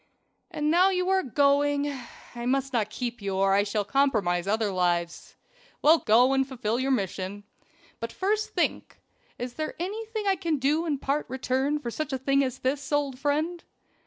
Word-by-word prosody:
"And 305 -3 -1
now 360 +3 +5
you 365 -1 0
are 380 0 +3
going. 285 +1 +2 0.4
I 240 0 -4
must 270 +1 0
not 215 -4 +1
keep 240 0 -5
you 195 -1 -2
or 195 0 +3
I 200 - +4
shall 205 0 -1
compromise 205 -10 +1
other 215 0 +1
lives. 175 -2 -1 0.5
Well, 315 +2 +6
go 245 +5 +4
and 270 0 +2
fulfill 235 -3 -2
your 265 +1 0
mission. 200 -4 -2 0.6
But 230 0 -4
first 420 +3 -1
think - - -1 0.4
is 245 0 -5
there 310 +4 -4
anything 430 +4 -4
I 390 -1 +2
can 325 -2 -1
do 300 +5 +1
in 295 -3 0
part 280 +3 -1
return 265 +3 0
for 240 -5 -5
such 310 +3 -4
a - - +1
thing 275 +1 +2
as 255 -2 -3
this, 270 +2 -2
old 285 -3 0
friend?" 310 +5 -1
270 Hz, 180 wpm, -27 LUFS, 225-300 Hz, 0.6 s, Well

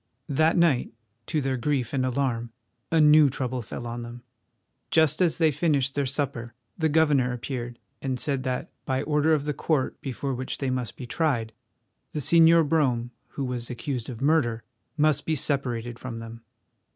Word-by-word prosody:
That 155 +5 +3
night, 165 -8 +3 0.4
to 155 -2 0
their 135 -1 -1
grief 130 -1 -1
and 130 -2 +1
alarm, 125 -3 -1 0.4
a 165 - +4
new 150 -1 +7
trouble 130 -1 -3
fell 120 +2 -7
on 120 0 -5
them. 120 +1 -9 0.7
Just 160 +1 +3
as 175 -3 +2
they 160 -2 +4
finished 145 -3 +1
their 140 -2 0
supper 125 -4 -3 0.2
the 160 -2 +1
governor 145 -5 +3
appeared 120 0 -5 0.2
and 130 -2 -2
said 140 -4 0
that, 130 -1 -3
by 130 +1 -1
order 150 +1 +2
of 145 -1 -3
the 150 - -1
Court 145 -2 -1
before 135 0 -3
which 130 +1 -4
they 135 -2 -1
must 125 -4 -3
be 125 - -6
tried, 120 -6 -1 0.6
the 150 - -2
Señor 165 +1 +5
Brome, 125 -6 +1 0.3
who 140 - -1
was 125 -2 -4
accused 125 0 -4
of 120 -2 -7
murder, 135 -6 +2 0.3
must 150 -1 +2
be 160 - 0
separated 125 -5 -2
from 125 -3 -6
them. 115 0 -9
135 Hz, 175 wpm, -26 LUFS, 120-150 Hz, 0.7 s, new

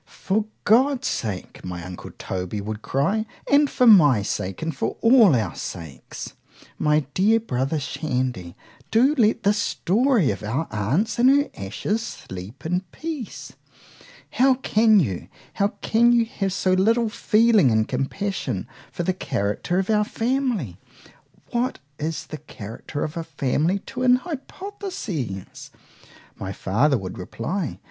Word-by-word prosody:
For 210 +3 -1 0.2
God's 260 +4 +3
sake, 105 -5 -4
my 90 -1 -6
uncle 90 -1 -8
Toby 95 +2 -4
would 105 +1 -5
cry,——and 220 - +1
for 250 - +2
my 150 - +7
sake, 95 - -3
and 160 -3 -2
for - - -2
all 230 - +6
our 110 -3 -1
sakes, 80 -8 -7 0.5
my 150 0 +3
dear 215 +4 +4
brother 135 - -1
Shandy,—do 130 - -1
let 225 -7 +2
this 205 +1 +3
story 220 - +2
of - - -5
our 125 +10 -2
aunt's 140 - 0
and 250 +2 +6
her 285 +2 +3
ashes 105 - -2
sleep 95 - -9
in 180 +3 0
peace;——how 270 -2 -3
can 220 -4 +4
you,——how 140 - -2 0.2
can 235 +2 +4
you 235 -1 +4
have 195 -3 -3
so 185 0 +1
little 225 +5 +3
feeling 215 - +4
and 110 -1 +2
compassion 135 - -2 0.2
for 175 - -3
the 185 - +1
character 105 - -2
of 190 +3 0
our 210 -1 +3 1.5
family?——What 245 +2 0 0.2
is 155 +1 -3
the 155 - -8
character 115 +1 -7
of 155 +2 -4
a 165 - -2
family 160 +3 0
to - - -6
an 250 -1 +6
hypothesis? 270 - -6 0.7
my 95 - -4
father 125 +10 +1
would 95 -3 -7
reply. 150 - -4
175 Hz, 130 wpm, -23 LUFS, -, 1.5 s, my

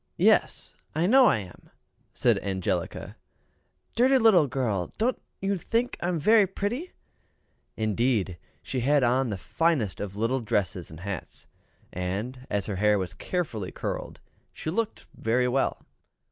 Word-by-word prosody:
"Yes, - - +2 0.2
I 160 +2 +2
know 255 +6 +7
I - - +4
am," 95 -4 -10 0.4
said - - +2
Angelica. 95 -2 -3 0.8
"Dirty 260 +3 +5
little 215 - +5
girl, 115 -8 -1
don't 240 +3 0 0.2
you 195 -1 0
think 235 +7 0
I 175 - -1
am 180 -1 0
very 210 +5 +5
pretty?" 235 - -3 0.8
Indeed, 110 -4 0 0.2
she 130 - -3
had 140 +3 +3
on 125 +1 +2
the 100 - -3
finest 125 - 0
of 100 -1 -5
little 115 +5 0
dresses 100 -5 -1
and 80 +1 -11
hats; 100 -3 -6 0.5
and, 105 +9 -4
as 100 -1 -1
her 100 -3 -3
hair 105 +1 +4
was 95 -3 -3
carefully 120 - -3
curled, - - -5 0.3
she - - -5
really - - -5
looked 225 -1 -2
very 125 +3 +1
well. 130 +2 0
125 Hz, 145 wpm, -27 LUFS, -, 0.8 s, know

